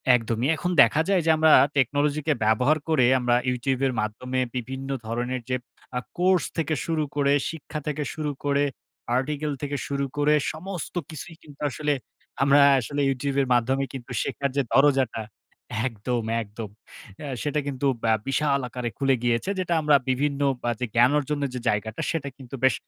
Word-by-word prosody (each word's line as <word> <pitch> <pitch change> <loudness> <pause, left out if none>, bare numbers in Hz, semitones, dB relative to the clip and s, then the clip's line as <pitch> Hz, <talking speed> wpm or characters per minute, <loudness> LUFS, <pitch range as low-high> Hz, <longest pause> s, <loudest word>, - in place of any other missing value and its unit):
একদমই। 115 +2 -1
এখন 180 +3 -2
দেখা 140 +7 +5
যায় 190 -3 +3
যে - - +2
আমরা 160 0 +5 0.3
technology 145 +3 +1
কে 155 - +4
ব্যবহার 125 +8 +3
করে 135 -6 +4
আমরা 120 -1 +2
YouTube 125 +1 -1
এর 130 - -1
মাধ্যমে 125 +5 -3 0.2
বিভিন্ন 130 +2 -5 0.2
ধরনের 120 +2 -2
যে 125 - +1 0.4
আ - - +1 0.2
কোর্স 180 0 +3
থেকে 160 -1 0
শুরু 160 -2 0
করে, 140 -1 +3 0.2
শিক্ষা 155 -1 -6
থেকে 150 0 -1
শুরু 150 -2 -2
করে, 145 0 +2 0.5
article 150 +2 -2
থেকে 145 0 -2
শুরু 140 0 -1
করে, 150 +1 +3 0.2
সমস্ত 180 +1 -6 0.2
কিছুই 160 +2 -8
কিন্তু 145 -2 -15
আসলে 150 +2 -1 0.5
আমরা 140 +1 +5 0.2
আসলে 145 +4 -3
YouTube 135 +1 -2
এর 135 - -1
মাধ্যমে 130 +3 +2
কিন্তু 125 -1 -8
শেখার 140 0 -2
যে - - +4
দরজাটা, 135 -5 +3 0.7
একদম 115 +1 -3 0.2
একদম। 105 0 -7 0.5
অ্যা 145 - -6
সেটা 150 0 0
কিন্তু 140 0 -3 0.2
অ্যা 110 -1 +3
বিশাল 140 0 +1
আকারে 125 0 -4
খুলে 135 -1 +3
গিয়েছে 120 +10 +1
যেটা 175 -2 0
আমরা 150 -1 +4
বিভিন্ন 140 +2 0 0.2
অ্যা 120 - +1
যে 125 - 0
জ্ঞান 120 +4 +6
অর্জনের 145 -1 -1
যে - - -2
জায়গাটা, 105 +1 -2
সেটা 140 -4 -3
কিন্তু 135 0 -9
বেশ 130 -4 +5
140 Hz, 170 wpm, -25 LUFS, 125-150 Hz, 0.7 s, জ্ঞান